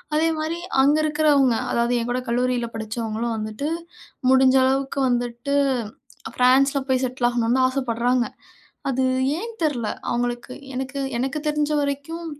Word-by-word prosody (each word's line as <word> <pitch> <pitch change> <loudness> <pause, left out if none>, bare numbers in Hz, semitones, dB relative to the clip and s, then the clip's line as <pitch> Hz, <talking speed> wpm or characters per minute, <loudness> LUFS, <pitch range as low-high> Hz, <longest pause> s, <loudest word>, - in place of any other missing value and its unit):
அதேமாரி, 320 +1 0 0.2
அங்க 290 +3 +4
இருக்கிறவங்க 295 -5 +3 0.2
அதாவது 235 +1 +1
என் 235 - -4
கூட 255 +1 -1
கல்லூரில 245 -1 0
படிச்சவங்களும் 225 +1 -3
வந்துட்டு, 215 +8 -3 0.6
முடிஞ்ச 265 0 +5
அளவுக்கு 270 +1 0
வந்துட்டு, 245 +3 -1 0.8
ஃபிரான்ஸில 270 +3 +4
போய் 260 0 +2
செட்டில் 245 -1 0
ஆகணும்னு 240 +1 +1
தான் 255 - +5
ஆசைப்படுறாங்க. 245 -1 0 0.6
அது 260 0 0 0.3
ஏன் 460 +4 -5
தெரில. 245 -8 0 0.2
அவங்களுக்கு 240 +1 -2 0.2
எனக்கு 265 +2 -4 0.2
எனக்கு 270 +4 -2
தெரிஞ்ச 300 0 0
வரைக்கும் 285 +4 -3
260 Hz, 125 wpm, -23 LUFS, 240-280 Hz, 0.8 s, முடிஞ்ச